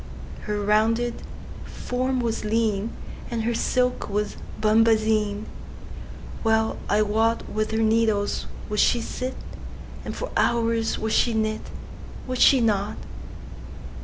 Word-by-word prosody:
Her 210 0 -2
rounded 225 +3 +1 0.4
form 255 +1 -2
was 230 -2 -2
lean, 215 -1 0 0.4
And 230 -2 -2
her 235 +1 0
silk 250 +1 0
was 210 +1 -1 0.2
bombazine:Well 220 0 0
I 210 +1 +3
wotWith 215 0 0
her 220 - -1
needles 220 -2 +1 0.2
would 210 0 -2
she 240 - +4
sit, 255 +3 -4 0.7
And - - -5
for - - -5
hours 230 -1 +1
would 220 0 -2
she 235 -2 +3
knit,—Would 220 +3 -5
she 265 -3 +6
not? 210 -2 0
220 Hz, 105 wpm, -24 LUFS, 215-230 Hz, 0.7 s, she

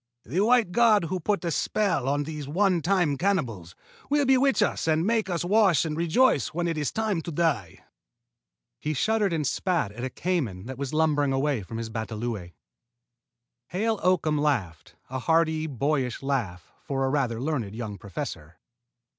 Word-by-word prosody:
"The 160 +10 -2
white 225 -2 +3
god 220 -2 +4
who 180 +3 -2
put 180 0 -1
a 170 - 0
spell 165 - 0
on 145 +1 +1
these 150 -2 -6
one 180 +3 +2
time 175 -5 +1
cannibals 120 - -1 0.3
will 290 0 +2
bewitch 265 -2 +4
us - - -1
and 160 +1 +2
make 220 -2 +1
us 175 -1 -1
wash 195 -5 +4
and 155 -1 -2
rejoice 170 - +3
when 170 +2 -2
it 165 - -1
is 150 -2 -1
time 215 -6 -1
to 170 - -6
die." 145 - -1 1.0
He 155 0 -2
shuddered 215 +5 +1
and 160 -3 -1
spat 165 - 0
at 120 +4 -8
a 130 - -2
cayman 130 - -2
that 130 +1 -7
was 140 -2 -3
lumbering 150 -3 +2
away 135 -3 0
from 110 +4 -7
his 115 -1 -5
batalõe. 110 -4 -4 1.1
Hale 220 +3 -1
Oakham 165 -5 +2
laughed, 110 - -1 0.2
a 130 - -2
hearty 160 +2 +1
boyish 135 -2 -1
laugh 110 -11 -3
for 135 -1 -2
a - - +1
rather 130 -5 0
learned 125 -7 -2
young 110 -4 -5
professor. 90 -5 -7
155 Hz, 170 wpm, -26 LUFS, 125-180 Hz, 1.1 s, god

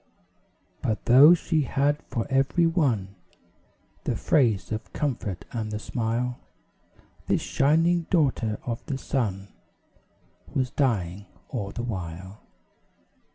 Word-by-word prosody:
But 110 -2 -2
though 140 +8 +8
she 160 -2 0
had 145 +2 +1
for 115 - -2
every 135 +5 +2
one 130 - +1 0.9
The - - 0
phrase 115 -10 +2
of 110 -1 -4
comfort 110 - -3
and 110 -3 -3
the 105 - -2
smile, 120 +2 -2 0.9
This - - +2
shining 165 +4 +2
daughter 130 - +1
of 115 -2 -4
the 140 - -2
sun 100 -8 -2 1.1
Was 130 -2 0
dying 100 - -1 0.2
all 105 -7 -3
the 120 - -5
while. 95 -2 -6
120 Hz, 110 wpm, -26 LUFS, 105-145 Hz, 1.1 s, though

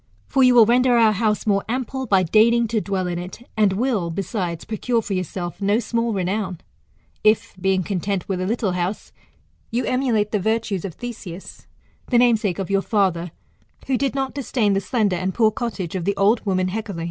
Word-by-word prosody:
For 270 - +1
you 250 -1 +6
will 230 -2 +8
render 245 +1 +4
our 225 -2 +5
house 210 +1 0
more 200 -2 +2
ample 260 +2 -3
by 195 -3 +4
deigning 230 +6 +4
to 220 -2 0
dwell 195 -2 -2
in 175 -1 -3
it: 185 +7 -9
and 210 -4 +3
will, 210 -5 0
besides, 180 -1 -3
procure 230 +2 -1
for 200 - -4
yourself 185 0 -4
no 200 +2 +2
small 235 0 -1
renown, 190 -1 -2 0.7
if, 215 0 +2
being 190 0 +2
content 195 0 -2
with 185 -2 -2
a 185 - -1
little 220 -2 0
house, 180 +3 -3 0.6
you 240 +2 -1
emulate 245 -5 +1
the 210 - +1
virtues 220 -2 -1
of 180 - -6
Theseus, 210 -7 -8 0.4
the 245 - +2
namesake 225 -7 +3
of 195 0 -4
your 195 0 +3
father, 185 -5 0 0.6
who 265 - 0
did 275 +1 -1
not 270 -1 -2
disdain 245 -6 0
the 195 - +1
slender 200 -1 0
and 185 +1 -2
poor 220 -2 +4
cottage 215 -8 -4
of 185 -3 -3
the 200 0 0
old 210 +3 +2
woman 185 -1 +1
Hecale. 205 -3 -4
205 Hz, 195 wpm, -22 LUFS, 185-235 Hz, 0.7 s, will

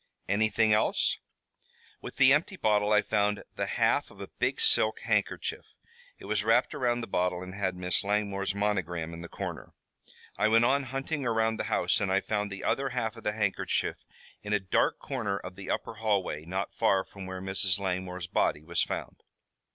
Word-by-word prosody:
"Anything 110 +2 +3
else?" 105 - +2 0.8
"With - - -8
the 130 +1 +6
empty 165 +6 +1
bottle 105 -4 +2
I 105 0 +5
found 105 -1 +1
the - - -1
half - - +2
of - - -17
a - - -8
big - - +1
silk 110 0 +2
handkerchief. 105 -3 -1 0.5
It - - -12
was 105 0 0
wrapped 115 +3 +3
around 120 -2 0
the - - -3
bottle 90 -1 0
and 90 0 -8
had 95 -2 -1
Miss 90 -1 -1
Langmore's 100 -1 0
monogram 90 -5 -1
in 85 - -7
the 85 - -8
corner. - - -6 0.7
I - - +4
went 115 +2 +5
on 140 +2 +2
hunting 135 +3 -3
around 110 -1 +1
the - - -1
house - - +1
and 100 -2 0
I 95 - +4
found 105 0 -2
the 100 - -6
other 135 0 +1
half 120 -3 -2
of - - -12
the 105 - 0
handkerchief 105 -3 -1 0.4
in 105 0 -3
a 105 - +3
dark 95 -2 +1
corner 110 -8 -2
of 90 -2 -8
the 100 0 -8
upper - - -2
hallway, 100 -8 -1
not 95 +3 -3
far 95 -1 +2
from 95 -2 -9
where 95 0 -5
Mrs. 95 -1 0
Langmore's 90 -2 -3
body 75 -3 0
was 85 +1 0
found." - - -4
105 Hz, 190 wpm, -29 LUFS, 95-110 Hz, 0.8 s, the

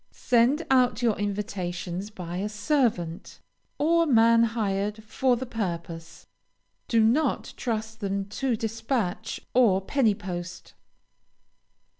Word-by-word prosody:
Send 250 +6 +2
out 250 -3 +3
your 225 -3 +3
invitations 195 -2 -3
by 180 -4 -6
a 200 +3 -2
servant, 210 - -1 0.4
or 335 +2 +3
man 230 -3 +5
hired 210 -2 -1
for 250 +4 +1
the 255 +2 -4
purpose; 170 -7 -5 0.6
do 230 -1 +3
not 250 +8 +1
trust 220 -2 -3
them 200 -2 -2
to 250 +3 -1
despatch 225 -2 -3
or 230 -7 +4
penny 220 +1 +1
post. 175 -2 -7
220 Hz, 110 wpm, -26 LUFS, 195-240 Hz, 0.6 s, man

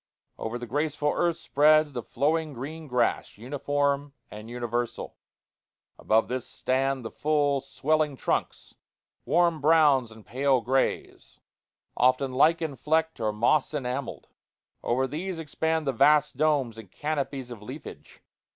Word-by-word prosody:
Over 115 +2 -3
the 120 - -6
graceful 150 +3 -1
earth 170 -1 +1
spreads 155 +1 +3
the 120 - -3
flowing 155 +5 -1
green 150 +6 -7
grass, 125 -5 0
uniform 140 +3 -1 0.2
and 105 +2 -9
universal. 120 0 -3 0.8
Above 110 +1 +2
this 130 0 -4
stand 130 -1 -1
the 115 - -5
full, 145 -2 +1
swelling 150 0 0
trunks - - -2 0.5
warm 170 -2 +2
browns 145 -6 +4
and 110 -1 -14
pale 135 +1 +1
grays 130 +3 -2 0.6
often 130 +1 +2
lichen 160 +2 +2
flecked 160 +1 0
or 110 -2 0
moss 125 +8 +1
enamelled. 130 -1 -4 0.5
Over 130 +3 0
these 165 +7 -4
expand 160 0 -1
the 135 - 0
vast 150 +5 +4
domes 140 -8 +1
and 105 -4 -12
canopies 140 -4 -3
of 115 -3 -9
leafage. 105 - -10
140 Hz, 130 wpm, -27 LUFS, 125-155 Hz, 0.8 s, browns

